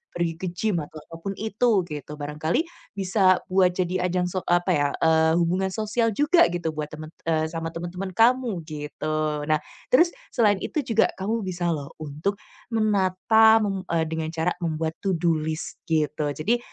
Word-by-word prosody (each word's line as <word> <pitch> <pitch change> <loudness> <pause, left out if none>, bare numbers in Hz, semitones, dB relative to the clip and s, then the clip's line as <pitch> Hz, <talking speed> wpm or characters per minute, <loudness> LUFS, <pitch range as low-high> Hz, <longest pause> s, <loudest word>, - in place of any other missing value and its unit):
pergi 170 -1 -1
ke 185 - -3
gym 190 +2 -1
atau 155 +1 -10
apa 165 - -10
pun 195 - -2
itu 220 -1 +1
gitu. 150 -3 -7
Barangkali 150 - -1 0.3
bisa 190 -1 +3
buat 185 -1 +4
jadi 180 0 0
ajang 180 0 0
sok 185 0 -3
apa 175 +1 +2
ya, 145 -1 +2
eee, 160 0 +4
hubungan 185 +3 +1
sosial 225 +2 0
juga 310 - +5
gitu 170 -2 -2
buat 150 -1 -3
temen 155 0 -8 0.2
eee, 160 -1 +2
sama 165 0 -4
teman-teman 175 +3 -5
kamu 230 -5 +3
gitu. 155 0 -3
Nah, 155 -1 +3 0.3
terus 340 +7 +5 0.2
selain 210 -5 +3
itu - - -2
juga 225 -3 +3
kamu 215 +3 -1
bisa 175 -1 -2
loh 145 -3 -4
untuk 155 +6 -3 0.4
menata, 220 +1 +4
mem 195 -2 -2
eee, 165 -1 +2
dengan 160 0 -3
cara 165 +2 0
membuat 160 -1 -2
to-do 175 -4 +2
list 155 +1 -4
gitu. 150 -2 0
Jadi, 215 - +1
175 Hz, 170 wpm, -25 LUFS, 160-200 Hz, 0.4 s, juga